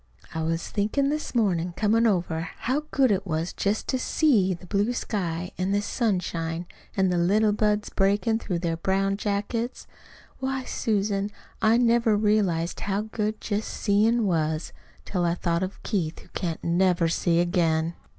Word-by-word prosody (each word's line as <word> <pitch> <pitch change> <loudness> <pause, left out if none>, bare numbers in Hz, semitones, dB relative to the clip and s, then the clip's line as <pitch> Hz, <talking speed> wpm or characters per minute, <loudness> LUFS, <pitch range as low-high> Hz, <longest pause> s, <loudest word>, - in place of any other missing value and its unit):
I 160 - -2
was 165 +1 -1
thinkin' 220 +7 0
this 300 -3 -3
mornin', 180 -6 +1
comin' 225 +4 +3
over, 175 -4 0
how 280 +5 -1
good 265 -4 +3
it 195 0 0
was 160 +1 -2
just 205 +2 -1
to 260 - +1
SEE 220 - +2
the 180 - -13
blue 205 +5 0
sky 180 -7 -3
an' 185 +2 0
the 205 - +2
sunshine 175 -7 -1 0.3
an' 190 -1 +3
the 175 -1 +1
little 210 +5 +3
buds 210 0 0
breakin' 205 +3 +2
through 185 -6 -2
their 165 -1 -1
brown 195 +3 +1
jackets. 210 +4 -2 0.5
Why, 265 0 -2
Susan, 205 -4 -1 0.3
I 220 +2 +5
never 235 -2 +3
realized 200 -6 +1
how 200 0 -1
good 215 -1 -2
just 210 0 -2
seein' 220 +3 +2
was 160 -3 0 0.3
till 180 -3 -1
I 170 0 +1
thought 170 -1 0
of 190 +1 -5
Keith, 170 -7 -1
who - - -14
can't 170 -4 -4
never 175 0 +2
see 170 +1 +1
again." 165 -2 +1
195 Hz, 160 wpm, -26 LUFS, 175-220 Hz, 0.5 s, I